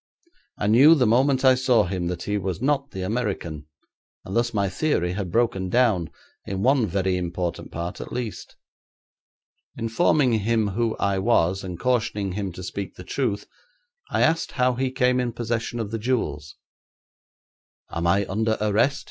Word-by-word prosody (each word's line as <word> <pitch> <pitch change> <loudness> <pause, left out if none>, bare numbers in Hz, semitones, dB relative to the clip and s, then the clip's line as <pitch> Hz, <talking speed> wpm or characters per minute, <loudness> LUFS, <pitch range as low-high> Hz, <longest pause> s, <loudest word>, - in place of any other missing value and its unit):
I - - -2
knew 130 +10 +7
the 130 -5 +3
moment 130 +4 +3
I 130 - +8
saw 125 -3 +3
him 90 -2 -3
that 90 -1 -4
he 105 - -2
was 95 -1 -3
not 140 +2 0
the 95 -6 -5
American, 95 -8 -3 0.6
and 95 - -5
thus 120 0 +1
my 100 -3 0
theory 90 - 0
had 95 -2 -3
broken 110 -5 +1
down, 105 -8 +2 0.3
in 95 0 -4
one 130 -3 +3
very 95 0 0
important 90 -1 -4
part 85 +1 -5
at - - -8
least. 115 -7 -5 1.2
Informing 125 +3 +2
him 110 0 +1
who 115 +3 -1
I 100 -1 0
was, 95 -3 +2
and 90 -2 -6
cautioning 110 -5 0
him 100 0 -3
to 90 - -8
speak 100 +1 -5
the 90 - -10
truth, 110 0 -2 0.6
I - - +1
asked 165 +1 +1
how 125 -1 +2
he 130 +2 -1
came 125 0 +2
in 120 -2 -1
possession 120 0 -3
of 110 -2 -4
the 115 - -3
jewels. 105 - -2 1.4
'Am 85 +1 -1
I 100 +3 +3
under 110 +3 0
arrest?' 110 +7 +2
110 Hz, 165 wpm, -24 LUFS, 95-125 Hz, 1.4 s, I